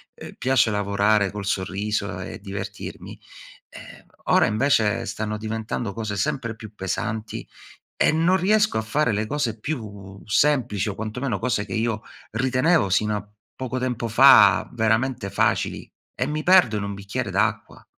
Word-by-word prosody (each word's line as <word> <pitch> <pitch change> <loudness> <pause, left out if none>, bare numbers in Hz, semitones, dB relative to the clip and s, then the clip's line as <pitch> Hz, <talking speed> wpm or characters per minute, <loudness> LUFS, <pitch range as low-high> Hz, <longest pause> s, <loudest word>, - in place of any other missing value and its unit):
uhm, - - -10
piace 130 -3 +3
lavorare 100 0 +1
col 100 -1 -6
sorriso 100 -1 -2
e 95 +4 -7
divertirmi, 100 +1 -7 0.5
ehm, - - -13 0.2
ora - - +4
invece 110 -2 +1
stanno 105 0 -3
diventando 110 0 -4
cose 110 -2 -4
sempre 115 +3 -2
più 110 -1 -11
pesanti, 110 +3 -4 0.6
e - - +4
non 165 +4 +3
riesco 210 - +2
a - - -1
fare 125 +5 0
le 105 +1 -1
cose 120 -6 -2
più 105 -8 -6
semplici, 120 -4 +1
o 100 - -5
quantomeno 110 +2 -3
cose 105 -1 -1
che 95 - -6
io 110 0 -1 0.3
ritenevo 130 - +2
sino 105 +3 +1
a 105 0 -6 0.3
poco 130 -1 -4
tempo 125 -2 -2
fa 105 -4 +7
veramente 115 -1 0
facili, - - 0 0.3
e 130 - -1
mi 150 +2 -2
perdo 175 - +5
in 100 - -3
un 100 0 -4
bicchiere 100 +4 -4
d'acqua. 95 +1 -1
110 Hz, 150 wpm, -23 LUFS, 100-130 Hz, 0.6 s, fa